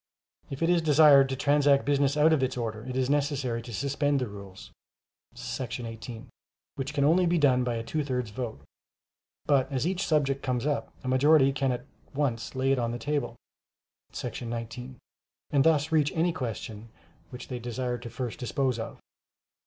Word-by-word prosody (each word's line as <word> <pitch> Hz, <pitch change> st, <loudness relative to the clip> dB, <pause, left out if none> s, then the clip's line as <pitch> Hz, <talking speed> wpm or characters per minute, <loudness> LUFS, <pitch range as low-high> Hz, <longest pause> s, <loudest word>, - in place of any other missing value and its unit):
If 135 Hz, +4 st, -4 dB
it 165 Hz, -, +2 dB
is 175 Hz, -1 st, +3 dB
desired 150 Hz, -3 st, +6 dB
to 135 Hz, -, -1 dB
transact 140 Hz, 0 st, +3 dB
business 140 Hz, 0 st, +2 dB
out 155 Hz, +2 st, +5 dB
of 150 Hz, -, +2 dB
its 130 Hz, -1 st, -1 dB
order, 110 Hz, -2 st, -4 dB
it 130 Hz, 0 st, -4 dB
is 130 Hz, -1 st, +1 dB
necessary 140 Hz, -4 st, 0 dB
to 120 Hz, -, -10 dB
suspend 140 Hz, +4 st, 0 dB
the 125 Hz, -, -2 dB
rules 100 Hz, -2 st, -11 dB, 0.6 s
[§ 120 Hz, -, -5 dB
18], 115 Hz, +2 st, -8 dB, 0.5 s
which 140 Hz, +2 st, -5 dB
can 140 Hz, -, +2 dB
only 175 Hz, +5 st, +4 dB
be 175 Hz, +1 st, +2 dB
done 130 Hz, -5 st, +3 dB
by 120 Hz, -1 st, -1 dB
a 115 Hz, -, -3 dB
two 155 Hz, +6 st, -2 dB
thirds 125 Hz, -5 st, -3 dB
vote; 115 Hz, -, -5 dB, 0.8 s
but 140 Hz, -1 st, +2 dB
as 135 Hz, +1 st, -1 dB
each 185 Hz, +2 st, -1 dB
subject 140 Hz, -3 st, +1 dB
comes 125 Hz, 0 st, -1 dB
up, 145 Hz, -1 st, -1 dB
a -, -, -6 dB
majority 135 Hz, +1 st, +4 dB
can 135 Hz, -1 st, 0 dB
at 125 Hz, 0 st, -4 dB, 0.3 s
once 130 Hz, -4 st, -1 dB
lay 130 Hz, +1 st, +1 dB
it 135 Hz, -, +2 dB
on 120 Hz, -1 st, 0 dB
the 120 Hz, -, -3 dB
table 145 Hz, +2 st, -2 dB, 0.8 s
[§ 120 Hz, -, -5 dB
19], 120 Hz, +2 st, -6 dB, 0.5 s
and 140 Hz, -2 st, +4 dB
thus 160 Hz, -1 st, +3 dB
reach 150 Hz, -2 st, +3 dB
any 170 Hz, +1 st, +2 dB
question 115 Hz, -3 st, -6 dB, 0.4 s
which 125 Hz, -1 st, -9 dB
they 125 Hz, -, -4 dB
desire 120 Hz, +1 st, -3 dB
to 120 Hz, 0 st, -8 dB
first 120 Hz, +3 st, -5 dB
dispose 130 Hz, -1 st, -1 dB
of. 110 Hz, -, -6 dB
130 Hz, 185 wpm, -28 LUFS, 120-145 Hz, 0.8 s, desired